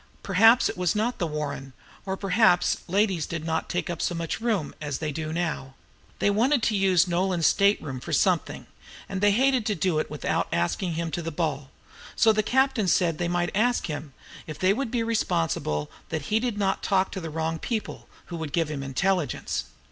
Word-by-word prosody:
Perhaps 225 +6 +5
it - - -5
was 180 0 +1
not 225 +4 -1
the 175 - 0
"Warren," 145 -3 -5 0.3
or 190 0 -2
perhaps 195 -2 +3
ladies 190 -3 +1
did 165 -2 -5
not 160 0 -2
take 180 - -2
up 170 -3 -4
so 175 - 0
much 165 +6 -3
room 215 -10 -1
as 145 -3 -3
they 155 -1 -3
do 155 +1 -4
now. 165 -6 -3 0.4
They 205 - +2
wanted 240 +5 +2
to 215 - +2
use 190 -3 +3
Nolan's 175 -1 0
state 200 +1 +4
room 135 -3 -6
for - - -8
something, - - +1 0.4
and 190 -1 -4
they 205 - +5
hated 255 +3 +3
to 210 - +1
do 175 -2 +1
it - - -2
without - - -1
asking 165 - -1
him 165 0 -2
to 175 - -2
the 165 - -4
ball; 150 -4 -2 0.5
so 220 -1 +5
the 215 - +2
captain 260 -2 +2
said 170 -1 +2
they 175 - 0
might 175 0 0
ask 240 +4 +2
him, 150 -3 -6 0.3
if 155 - -6
they 185 +1 +3
would 265 +2 -2
be 235 -1 0
responsible 165 - -1 0.2
that 160 +4 -4
he 220 - +4
did 235 -3 -2
not 195 -1 0
talk 190 -1 +1
with 190 - -5
the 165 - -4
wrong 160 +1 -2
people, 220 +3 -4 0.2
"who 170 - -6
would 160 -3 -5
give 165 -3 0
him 140 -2 -4
intelligence." 145 +3 -1
175 Hz, 205 wpm, -26 LUFS, 160-210 Hz, 0.5 s, Perhaps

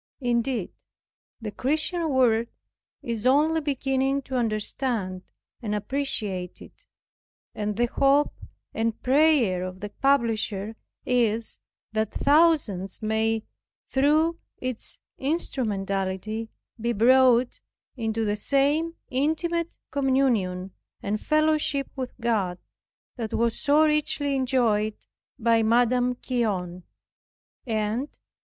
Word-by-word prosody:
Indeed, 240 -3 0 0.7
the 220 -3 -5
Christian 315 - 0
world 235 -4 +3 0.6
is 230 0 -2
only 310 +4 +3
beginning 270 -1 0
to 260 - -5
understand 215 -4 -1 0.4
and 210 -3 -2
appreciate 205 -6 -2
it, - - -15 0.7
and 210 -1 -3
the 240 - +3
hope 275 +4 +2 0.4
and 225 0 -1
prayer 260 - +3
of 185 0 -6
the 205 +1 -5
publisher 225 -5 0 0.3
is, 230 -2 0 0.3
that 220 -1 -1
thousands 280 - +2
may, 220 0 +1 0.5
through 310 +5 +2 0.2
its 255 -3 -4 0.2
instrumentality, 215 - -2 0.3
be 235 +2 0
brought 250 +2 +4 0.4
into 225 -2 -1
the 205 0 0
same 290 +8 +1 0.2
intimate 325 +5 0
communion 245 -10 +1 0.3
and 210 +1 -2
fellowship 305 -2 +1
with 255 -2 -6
God, 210 -7 0 0.6
that 225 -3 -3
was 235 0 0
so 300 +1 +4
richly 300 -2 0
enjoyed 235 -5 +1 0.4
by 230 -2 +3
Madame 245 +2 +3
Guyon. 185 -8 -2 0.8
E. 230 - -2
J. 215 +5 -1
240 Hz, 100 wpm, -26 LUFS, 215-275 Hz, 0.8 s, brought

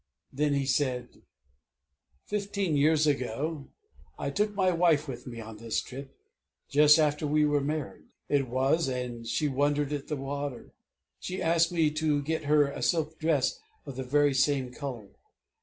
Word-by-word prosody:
Then 145 +1 +1
he 140 -1 0
said: 130 -2 -1 1.0
"Fifteen 200 -5 -1
years 155 +2 +4
ago 140 +2 -1 0.5
I - - -3
took 210 0 0
my 190 -2 +3
wife 165 -3 +3
with 125 -2 -7
me 120 -2 -7
on 110 -1 -9
this 115 0 -2
trip 135 +1 -9 0.5
just 150 +1 +6
after 150 -1 +1
we 150 +1 +3
were 145 -1 +2
married, 150 0 -4 0.2
it 140 -2 +1
was; 135 +6 +1
and 125 -3 -4
she 135 +6 0
wondered 145 +1 0
at 145 -2 -4
the 150 - -2
water. 140 -1 -5 0.5
She 185 +1 -5
asked 165 +1 +2
me 165 -3 +2
to 150 -1 0
get 160 +1 -2
her 150 0 +4
a 140 - -6
silk 160 -2 0
dress 155 -5 +1 0.3
of 135 - -7
the 130 - -4
very 145 +2 +2
same 135 -2 +1
color. 125 -9 -6
145 Hz, 160 wpm, -28 LUFS, 130-155 Hz, 1.0 s, just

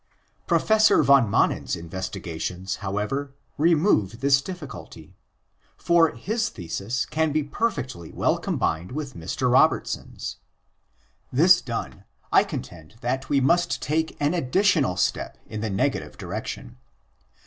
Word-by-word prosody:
Professor 220 0 +4
van 135 -5 +5
Manen's - - +1
investigations, 90 +1 -5
however, 105 +8 -3 0.2
remove 150 - +2
this 135 0 +4
difficulty. 170 -4 -9 0.6
For 170 -2 +4
his 220 - -1
thesis 100 +7 -3
can 155 0 0
be 155 +1 +1
perfectly 135 - -3
well - - +1
combined 85 +8 -2
with 145 -2 -5
Mr. 80 - -1
Robertson's. - - +1 0.9
This 175 +7 +6
done, 115 -3 -5 0.3
I - - +6
contend 80 +3 -8
that 130 +3 -2
we 140 -1 +3
must 170 +7 +2
take 160 +2 -1
an 145 +3 +1
additional 165 - +2
step 90 - -1
in 110 - -6
the 110 - -2
negative 95 - -1
direction. - - -6
135 Hz, 115 wpm, -24 LUFS, 100-160 Hz, 0.9 s, This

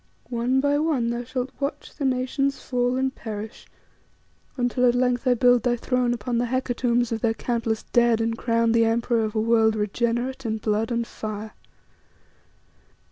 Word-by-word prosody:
One 245 +2 +1
by 285 +1 +2
one 280 -7 +1
thou 240 0 -3
shalt 255 +1 -4
watch 280 +1 -4
the 285 - -4
nations 265 +2 0
fall 245 0 0
and 265 0 0
perish, 215 -3 -7 0.9
until 245 0 +1
at 240 - +3
length 250 0 +1
I 250 - +5
build 245 0 +4
thy 245 +1 +1
throne 250 0 0
upon 240 0 -1
the 245 - 0
hecatombs 245 -1 0
of 225 -1 -2
their 225 -2 +1
countless 230 -2 -2
dead 235 -1 +3
and 225 0 0
crown 230 0 +1
thee 230 0 +4
emperor 230 0 +1
of 215 0 -3
a - - +2
world 220 0 +3
regenerate 235 +5 -1
in 220 -2 -1
blood 215 +1 -1
and 235 -1 -1
fire." 215 -1 -6
240 Hz, 170 wpm, -24 LUFS, 225-250 Hz, 0.9 s, I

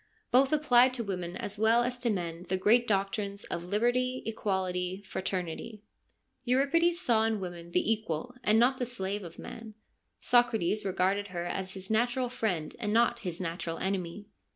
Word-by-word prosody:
Both 265 +3 +5
applied 255 -4 +5
to 235 - -3
women 180 -3 -4
as 205 0 -5
well 225 +2 +4
as 250 +1 -3
to 245 -1 0
men 175 -3 -3
the 190 - +1
great 235 +6 +4
doctrines 200 0 -1
of 170 - -3
liberty, 245 +6 +1
equality, 190 -3 -2
fraternity. 190 +3 -4 0.6
Euripides 285 +7 +2
saw 235 -10 +3
in 220 -1 +1
woman 175 -2 -7
the 180 +5 +1
equal 220 +2 -4
and 215 0 +4
not 250 +3 +3
the 250 - -1
slave 205 -4 -3
of 170 -1 -10
man, 225 -2 -9 0.4
Socrates 220 -4 +2
regarded 195 +2 +1
her 175 -2 -4
as 185 +1 -4
his 190 +2 -7
natural 240 +3 +1
friend 200 -11 -2
and 210 -3 -1
not 235 +1 +3
his 180 -6 -5
natural 165 -2 -3
enemy. 190 0 -3
210 Hz, 165 wpm, -30 LUFS, 185-240 Hz, 0.6 s, Both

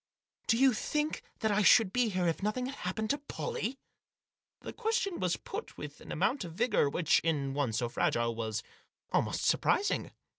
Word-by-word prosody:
Do 230 - +4
you 265 0 +5
think 300 +7 -1 0.2
that 220 -2 +2
I 205 +1 +3
should 205 -1 +6
be 245 -2 +2
here 185 -3 0
if 165 - -1
nothing 215 +5 -1
had 265 - -4
happened 215 +4 -2
to 285 - -1
Pollie?" 290 - -4 0.8
The - - -7
question 445 -4 -1
was 180 -2 0
put 435 +3 -7
with - - -8
an - - -10
amount 265 -3 +1
of 170 -2 -7
vigour 210 - +2
which, 160 +2 +3
in 145 -5 -1
one 140 -4 0
so 115 +2 0
fragile, 120 0 0
was 110 -1 -3 0.5
almost - - 0
surprising. 410 - +2
210 Hz, 180 wpm, -31 LUFS, -, 0.8 s, should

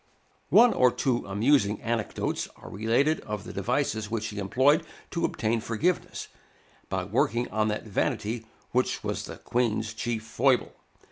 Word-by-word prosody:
One 240 +1 +7
or 125 - +5
two 125 -4 0
amusing 105 +1 +2
anecdotes 115 -2 -1
are - - -12
related 120 +10 +2
of 105 -2 -5
the - - -8
devices 105 -1 -1
which 110 -1 -2
he 105 - -6
employed 130 - +3 0.3
to 170 - 0
obtain 115 0 0
forgiveness, 145 +12 -1 0.6
by - - -1
working 120 +3 +1
on 110 0 +1
that 105 +1 -2
vanity 110 +2 -1 0.2
which - - 0
was - - -2
the - - -8
Queen's 115 -2 -1
chief 110 0 -3
foible. 130 +3 +2
115 Hz, 145 wpm, -27 LUFS, 110-125 Hz, 0.6 s, One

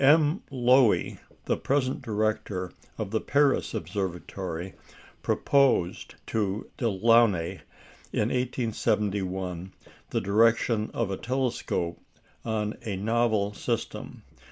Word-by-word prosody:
M. 150 +5 +5
Loewy, 125 -3 +3 0.3
the - - +1
present 135 -2 0
director 105 -4 -1 0.3
of 95 - -4
the 110 - 0
Paris 140 - +2
Observatory, 90 0 -4 0.5
proposed 135 -11 +2
to 105 -2 -1
Delaunay 115 -5 +3 0.5
in 110 - +1
1871 100 -7 -1 0.4
the - - 0
direction 110 +1 +3
of 115 -4 -1
a 95 - -2
telescope 125 -9 -2 0.4
on 110 -2 -2
a 105 -4 -3
novel 110 0 +1
system. - - -4
110 Hz, 95 wpm, -27 LUFS, 95-120 Hz, 0.5 s, M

